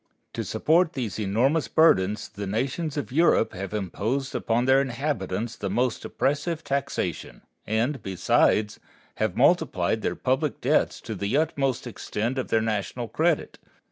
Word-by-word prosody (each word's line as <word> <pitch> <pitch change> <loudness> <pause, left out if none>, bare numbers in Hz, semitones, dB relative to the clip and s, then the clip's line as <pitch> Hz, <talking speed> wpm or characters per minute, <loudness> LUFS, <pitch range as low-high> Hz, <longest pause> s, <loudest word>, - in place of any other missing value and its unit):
To - - -3
support 165 +2 +2
these 115 -6 -4
enormous 120 +10 +1
burdens 105 - +3
the 100 -1 -7
nations 135 - -2
of 145 - -3
Europe 150 -6 +3
have 95 +1 -5
imposed 110 +7 -2
upon 120 +2 0
their 135 +1 +5
inhabitants 120 -5 -2
the 100 -3 -4
most 120 +4 0
oppressive 150 +4 -1
taxation, 140 - -3 0.2
and, 115 +5 0
besides, 105 +2 +2 0.4
have - - -1
multiplied - - +2
their - - -1
public 130 +3 -1
debts - - +1
to - - -6
the 100 +7 -1
utmost 135 -5 0
extent 120 +1 -3
of 130 - -3
their 110 - +2
national 110 +2 -2
credit. 160 +6 0
125 Hz, 140 wpm, -25 LUFS, 105-140 Hz, 0.4 s, their